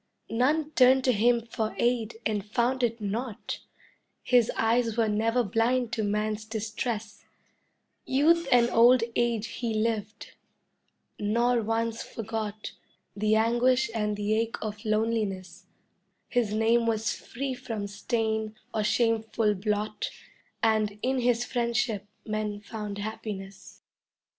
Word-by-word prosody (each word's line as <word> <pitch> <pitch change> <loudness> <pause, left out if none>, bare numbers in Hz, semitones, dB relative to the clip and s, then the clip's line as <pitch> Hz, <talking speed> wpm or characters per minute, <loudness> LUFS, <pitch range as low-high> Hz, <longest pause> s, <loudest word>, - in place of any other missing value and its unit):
"None 290 +7 +1
turned 260 -1 +5
to 255 - +4
him 235 +1 +2
for 225 -1 -3
aid 235 -2 0
and 210 -2 0
found 240 +5 0
it 235 -1 0
not, 215 +2 -4 0.6
His 245 -3 +4
eyes 230 0 +2
were 225 -1 +3
never 225 +3 +1
blind 230 +3 +1
to 230 - -1
man's 210 +1 -1
distress, 220 0 -4 0.8
Youth 315 +5 +3
and 240 -1 +6
old 240 +1 +6
age 235 -2 +1
he 230 -3 -1
lived, 215 -1 -2 0.9
nor 235 +3 +2
once 225 +1 -1
forgot 215 -1 -5 0.4
The 215 +1 +2
anguish 240 +3 +3
and 210 -2 -1
the 210 +1 0
ache 225 +1 0
of 210 -1 -5
loneliness; 215 -3 -1 0.6
His 240 -4 +1
name 230 +2 +2
was 220 -1 0
free 270 +2 -5
from 230 -5 -5
stain 220 +1 -2 0.2
or 215 - 0
shameful 225 0 +1
blot 210 +2 -2 0.5
And 215 -2 +2
in 260 +1 +1
his 240 -1 +2
friendship 235 -4 -1 0.2
men 215 -1 -2
found 210 -1 -6
happiness." 205 -2 -7
225 Hz, 125 wpm, -28 LUFS, 215-240 Hz, 0.9 s, and